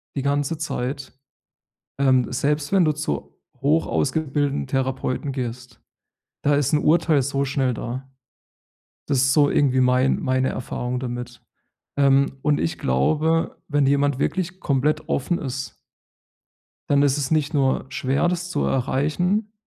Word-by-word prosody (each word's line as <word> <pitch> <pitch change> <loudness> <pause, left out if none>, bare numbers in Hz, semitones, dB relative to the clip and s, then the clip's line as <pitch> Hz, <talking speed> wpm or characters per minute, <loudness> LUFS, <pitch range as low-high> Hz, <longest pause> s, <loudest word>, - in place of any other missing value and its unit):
die 140 - -1
ganze 145 +3 0
Zeit. 135 -3 -4 0.9
Ähm, 130 -2 +3
selbst 145 +3 0
wenn 190 -2 +5
du 155 - +3
zu 145 - -4 0.2
hoch-ausgebildeten 145 -1 0
Therapeuten 135 +1 -2
gehst. 125 -2 -6 0.6
Da 145 0 +3
ist 145 -1 +1
'n 150 - +4
Urteil 155 -1 +3
so 140 +1 -1
schnell 135 -2 0
da. 130 +4 -6 1.0
Das 140 -2 +1
ist 130 +1 +3
so 145 -2 +4
irgendwie 130 -2 +2
mein 125 +1 +3
meine 130 0 +1
Erfahrung 125 0 -4
damit. 120 -1 -6 0.6
Ähm, 140 -1 +3
und 150 -1 +2
ich 85 - -2
glaube, 155 - +1
wenn 145 -2 +2
jemand 140 -1 +2
wirklich 185 +2 -2
komplett 150 +3 0
offen 170 +6 0
ist 135 -1 -5 1.1
dann 140 0 +4
ist 145 0 +2
es 140 -2 -2
nicht 155 0 +1
nur 135 -2 +1
schwer, 135 +4 0
das 180 0 -2
zu 145 - -1
erreichen, 175 - 0
140 Hz, 135 wpm, -23 LUFS, 130-150 Hz, 1.1 s, wenn